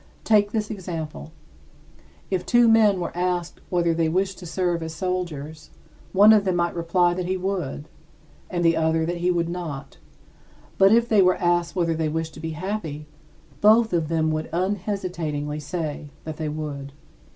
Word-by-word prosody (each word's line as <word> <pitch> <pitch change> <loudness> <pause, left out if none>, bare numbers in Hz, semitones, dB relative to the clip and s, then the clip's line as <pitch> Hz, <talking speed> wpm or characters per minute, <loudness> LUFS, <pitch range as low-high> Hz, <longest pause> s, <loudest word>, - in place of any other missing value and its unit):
Take 205 -2 +3
this 215 -1 -2
example: 160 - -6 1.0
If 185 -2 0
two 240 -1 +4
men 215 -4 +5
were 175 - -4
asked 175 -1 -2
whether 170 -2 +2
they 165 -1 +1
wished 190 +3 -1
to 180 - -9
serve 175 0 -1
as 160 0 -5
soldiers, 160 -5 -4 0.4
one 205 +3 +7
of 210 -2 +4
them 185 -2 0
might 175 0 0
reply 175 +1 +2
that 180 0 -3
he 185 +1 0
would, 180 -6 -3 0.6
and 175 -2 -1
the 165 0 +4
other 160 0 +1
that 175 +1 -2
he 175 +1 0
would 170 -2 +1
not; 160 -6 -6 0.8
but 195 0 +7
if 230 +1 +4
they 215 -4 +4
were 185 0 +4
asked 175 0 +1
whether 170 -2 +1
they 160 -1 -1
wished 160 +1 -3
to - - -11
be 160 0 -4
happy, 165 -5 -4 0.6
both 220 0 +5
of 165 -3 +1
them 160 -1 +1
would 155 0 -3
unhesitatingly 175 -6 -2
say 150 -1 -4
that 155 -1 -6
they 155 -1 -3
would. 145 -2 -5
175 Hz, 175 wpm, -24 LUFS, 160-190 Hz, 1.0 s, one